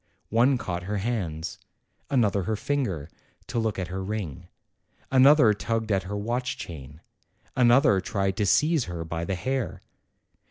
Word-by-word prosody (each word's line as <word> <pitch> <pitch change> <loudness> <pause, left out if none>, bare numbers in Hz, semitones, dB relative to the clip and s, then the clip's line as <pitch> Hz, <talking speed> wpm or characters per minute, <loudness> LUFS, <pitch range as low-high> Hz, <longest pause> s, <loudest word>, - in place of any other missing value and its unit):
One 125 +4 +4
caught 85 -6 -4
her 105 - -1
hands; 95 -5 -3 0.5
another 105 -7 +2
her 110 - 0
finger, 105 - -2 0.4
to 120 - -2
look 110 -2 -1
at 90 -3 -3
her 95 +1 -4
ring; 95 -8 -5 0.6
another 135 -3 +6
tugged 110 +1 -2
at 95 -1 +2
her 105 - -3
watch 120 +4 -2
chain; 75 -2 -9 0.5
another 120 -5 +5
tried 95 0 -1
to 105 - +1
seize 155 - +3
her 85 -2 -5
by 85 +1 -3
the 95 - -2
hair. 130 +6 -3
105 Hz, 150 wpm, -26 LUFS, 90-120 Hz, 0.6 s, another